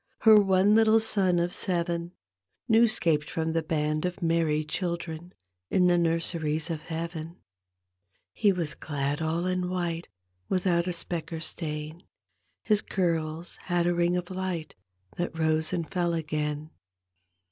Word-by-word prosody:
Her 215 -2 +8
one 195 +1 +4
little 220 0 +5
son 195 -5 +2
of 175 +1 0
seven, 170 -1 0 0.5
New 230 0 +5
'scaped 160 -8 +1
from 160 0 -2
the 165 - +1
band 155 -1 -1
of 180 +1 -3
merry 165 -2 +2
children 170 0 -4 0.4
In 180 - +3
the 175 0 +5
nurseries 165 -1 0
of 155 -2 -3
Heaven. 165 +1 -5 1.0
He 205 -3 +3
was 170 -5 -1
all - - -21
clad 145 0 -2
in 180 +3 -1
white 175 -2 -2 0.4
Without 180 -2 +1
a - - 0
speck 170 -1 -4
or 165 - -4
stain; 155 0 -4 0.6
His 210 -2 +3
curb 165 -3 -1 0.2
had 175 -1 +1
a 175 - +2
ring 175 +1 +2
of 180 +1 -5
light, 185 -4 -3 0.4
That 175 -2 -3
rose 160 0 +1
and 170 -3 -2
fell 175 -2 0
again. 150 -1 -3
170 Hz, 145 wpm, -27 LUFS, 160-180 Hz, 1.0 s, Her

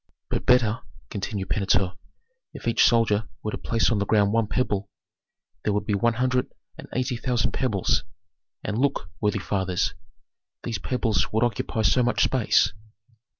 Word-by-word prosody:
"But - - -2
better," 120 -4 +4 0.3
continued 95 -1 -4
Pentuer, 95 -2 +2 0.6
"if - - -7
each 115 - +4
soldier 110 -3 +3
were 105 - -2
to - - -3
place 115 0 +1
on 110 - +1
the 100 - 0
ground 105 -1 +3
one 115 -1 +2
pebble, 100 -5 -1 0.7
there 105 - +1
would 105 0 -1
be 105 - 0
one 115 +4 +2
hundred 125 +1 0 0.2
and - - -10
eighty 125 0 -1
thousand 120 0 0
pebbles; 110 -8 +1 0.6
and, 105 +2 -2
look, 135 -10 0
worthy 105 0 +1
fathers, 95 -2 -1 0.7
these 115 -5 -3
pebbles 115 -4 0
would 110 +2 +2
occupy 115 -1 -1
so 125 - +4
much 125 0 +2
space." 125 -4 +3
110 Hz, 155 wpm, -25 LUFS, 100-120 Hz, 0.7 s, better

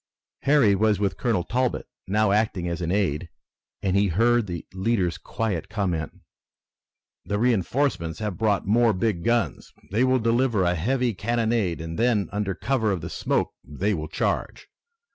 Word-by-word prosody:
Harry 140 -8 +4
was 105 +1 +2
with 100 -2 0
Colonel 115 -9 0
Talbot, 125 +6 -1 0.2
now 105 +1 +2
acting 100 -4 +1
as 85 +1 -3
an 85 0 -1
aide, 90 -5 0 0.5
and 95 -1 +1
he 100 +1 +4
heard 115 +5 +2
the 85 -3 -5
leader's 95 -3 0
quiet 105 -8 -3
comment: 90 -7 -2 1.0
"The 105 - -2
reinforcements 110 - 0
have 105 -4 -3
brought 105 -1 +1
more 115 +2 +4
big 95 -3 -1
guns. 120 0 0 0.2
They 110 +5 +2
will 130 0 +3
deliver 115 -2 +2
a 90 0 +2
heavy 120 +7 0
cannonade 110 -3 0
and 80 0 -5
then 115 -4 +2
under 100 -2 -2
cover 120 -3 0
of 95 -4 -2
the 85 - -6
smoke - - -1
they 100 +8 -1
will 80 -4 -3
charge. 80 - -2
105 Hz, 160 wpm, -25 LUFS, 90-115 Hz, 1.0 s, Harry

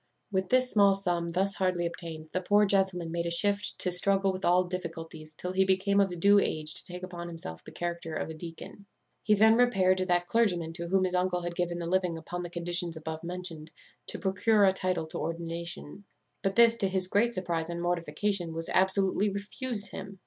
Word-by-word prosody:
"With 190 -1 -1
this 255 0 +3
small 200 -2 +5
sum 175 -3 -1
thus 190 +4 0
hardly 185 -3 0
obtained 165 -2 -6
the 185 - 0
poor 205 +3 +4
gentleman 190 -4 +1
made 170 0 -2
a - - 0
shift 205 +4 +2
to 180 - 0
struggle 195 +2 +2
with 185 +1 -7
all 180 +1 +4
difficulties 165 -3 -6
till 180 +4 -5
he 190 +1 +3
became 190 +1 +2
of 185 -3 +1
due 200 +3 +6
age 155 -4 0
to - - -1
take 180 0 -8
upon 175 -2 -6
himself 165 - -8
the - - -11
character 170 -2 -4
of - - -3
a 160 - -6
deacon. 165 +5 -10 0.3
He 210 - +3
then 220 +2 +6
repaired 190 -7 +3
to 185 - 0
that 175 -1 +2
clergyman 175 -7 +1
to 170 0 -5
whom 190 +1 +2
his 185 -1 -1
uncle 180 0 0
had 175 0 -3
given 175 0 -2
the 170 - -4
living 180 -1 0
upon 175 +2 -6
the 175 - -6
conditions 175 -1 0
above 160 +1 -6
mentioned, 170 -3 -5 0.4
to - - -2
procure 200 +2 +2
a 190 - +4
title 185 -3 -1
to 160 - -6
ordination; 170 +2 -5 0.4
but 195 -1 -1
this, 235 -1 +6
to 195 - +1
his 190 -1 +1
great 225 +6 +1
surprize 170 -3 -2
and 170 0 -4
mortification, 175 +1 -1
was 165 0 -4
absolutely 190 +2 +2
refused 205 +1 -3
him. 195 0 -8
180 Hz, 205 wpm, -29 LUFS, 170-195 Hz, 0.4 s, due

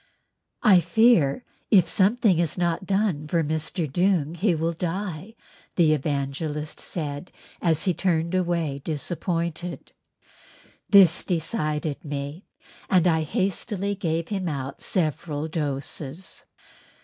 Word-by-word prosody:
"I 200 -6 +7
fear 220 - +3 0.2
if 185 -6 +5
something 200 -2 +3
is 170 -1 0
not 175 +1 -1
done 195 -7 0
for 165 +1 +1
Mr. 155 +2 -2
Doong 170 0 +1
he 180 +1 +2
will 165 +2 -1
die," 180 +3 -4 0.4
the 160 -3 +4
Evangelist 150 +1 -3
said 150 0 -5 0.3
as 160 -3 +2
he 185 - +2
turned 170 -1 0
away 170 -6 0
disappointed. 170 +2 -3 1.0
This 190 -5 +6
decided 155 -3 -2
me 145 +3 -5 0.4
and 180 -3 +4
I 160 -2 +3
hastily 195 +5 -2
gave 165 -4 -2
him 190 -4 -2
out 135 -2 -5
several 155 -2 -1
doses. 150 +1 -5
165 Hz, 115 wpm, -25 LUFS, 150-185 Hz, 1.0 s, I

